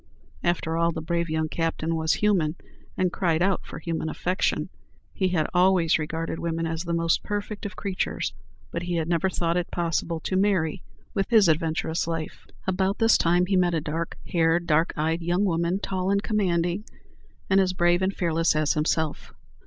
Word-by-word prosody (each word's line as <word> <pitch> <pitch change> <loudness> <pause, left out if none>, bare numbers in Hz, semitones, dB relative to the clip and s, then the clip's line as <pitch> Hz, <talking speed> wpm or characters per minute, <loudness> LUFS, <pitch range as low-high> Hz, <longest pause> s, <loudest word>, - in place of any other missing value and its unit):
After 165 -2 0
all, 170 0 +2
the 160 - -4
brave 170 +1 -1
young 160 0 0
captain 165 0 -1
was 160 0 +1
human, 180 -7 +1 0.4
and 185 -1 +1
cried 170 -2 +1
out 195 0 +1
for - - -9
a - - -11
human 165 -1 -2
affection. 180 +4 -1 0.4
He 190 - +1
had 175 -4 +1
"always 180 -3 +4
regarded 160 +1 -3
woman 165 0 -2
as 165 +1 -2
the 170 - -2
most 165 0 +2
perfect 205 0 -4
of 205 - -11
creatures"; 195 -2 -2 0.4
but 170 - -3
he 175 0 -2
had 160 -2 -1
never 170 +2 +1
thought 170 -1 0
it 175 - -1
possible 170 -1 -1
to 185 - -2
marry 190 -3 +1 0.3
with 195 -2 -1
his 220 -5 +6
adventurous 160 0 0
life. 165 -2 -5 0.2
About 190 +1 0
this 225 -1 +5
time 175 +2 +3
he 195 +1 0
met 175 -2 +3
a - - +2
dark 160 +2 -4
haired, 170 0 +2
dark 160 +1 +2
eyed, 160 +2 0
young 175 +4 +1
woman, 170 0 +1
tall 190 -2 -2
and 200 +1 +2
commanding, 180 -3 0 0.6
and 190 +1 +4
as 185 -1 +1
brave 175 0 +3
and 190 +1 0
fearless 165 -2 +1
as 155 -1 +2
himself. 155 0 -1
170 Hz, 185 wpm, -25 LUFS, 165-185 Hz, 0.6 s, his